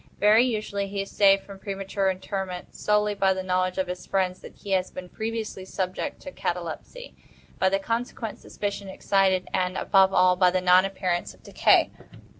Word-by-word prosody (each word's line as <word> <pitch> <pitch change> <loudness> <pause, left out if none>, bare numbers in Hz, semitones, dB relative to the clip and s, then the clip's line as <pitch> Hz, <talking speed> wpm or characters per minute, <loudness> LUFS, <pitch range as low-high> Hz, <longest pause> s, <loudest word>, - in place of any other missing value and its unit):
Very 215 +3 +5
usually 210 -4 -2
he 195 0 -3
is 195 - -12
saved 195 -1 +4
from 200 -1 -11
premature 195 0 -2
interment 190 -1 -5
solely 210 0 +1
by 195 -1 +2
the 190 - -4
knowledge 185 0 0
of 190 - +1
his 180 0 -7
friends 185 -2 0
that - - -12
he 200 - -9
has 185 -1 +1
been 180 -1 -9
previously 220 -3 -4
subject 185 +8 -4
to 280 - -8
catalepsy, 180 - -5 0.5
by 190 - +4
the 195 - +2
consequent 230 +1 -4
suspicion 200 -1 -5
excited, 190 -1 +1
and, 180 0 0
above 190 -1 +4
all, 185 -1 +4
by 180 0 +4
the 185 +1 +1
non 180 +1 +5
appearance 185 -2 -2
of - - -26
decay. - - +3
195 Hz, 180 wpm, -25 LUFS, 185-205 Hz, 0.5 s, Very